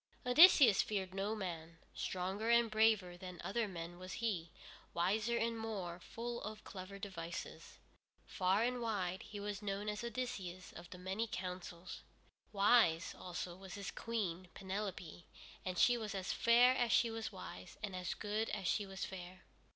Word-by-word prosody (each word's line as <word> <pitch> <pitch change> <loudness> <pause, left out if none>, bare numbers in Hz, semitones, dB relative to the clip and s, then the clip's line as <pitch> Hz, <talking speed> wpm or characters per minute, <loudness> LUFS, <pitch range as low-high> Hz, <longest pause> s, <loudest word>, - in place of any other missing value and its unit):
Odysseus 255 - +8
feared 190 -3 -2
no 200 +3 -1
man. 170 -5 -5 0.2
Stronger 190 +5 -2
and 235 -1 +5
braver 215 -5 +3
than 180 -1 -8
other 230 +2 0
men 175 -2 -7
was 185 0 -7
he, 205 -9 -1 0.5
wiser, 215 +7 +2
and 230 0 0
more 195 -6 -4
full 235 +5 -5
of 215 0 -6
clever 190 +1 -8
devices. 175 -4 -6 0.5
Far 190 +3 +2
and 245 0 0
wide 190 -4 -1
he 210 -2 -8
was 205 0 -4
known 205 0 -3
as 210 +2 -2
Odysseus 205 -7 -4
of 170 0 -10
the 180 - -9
many 190 +5 -2
counsels. 180 -1 -5 0.5
Wise, 200 -5 +4
also, 175 -1 -5
was 190 0 -9
his 200 -1 -5
Queen, 190 -6 -3
Penelope, 190 -3 -5 0.4
and 185 -1 -3
she 245 +4 +5
was 215 -2 -4
as 190 -1 -2
fair 240 +2 +6
as 240 -3 +1
she 230 - +4
was 225 0 -4
wise, 90 +1 -9
and 200 -3 -3
as 180 -1 -3
good 215 +1 -1
as 200 -3 -3
she 205 +3 +1
was 190 -1 -4
fair. 185 0 -8
195 Hz, 160 wpm, -37 LUFS, 180-225 Hz, 0.5 s, Odysseus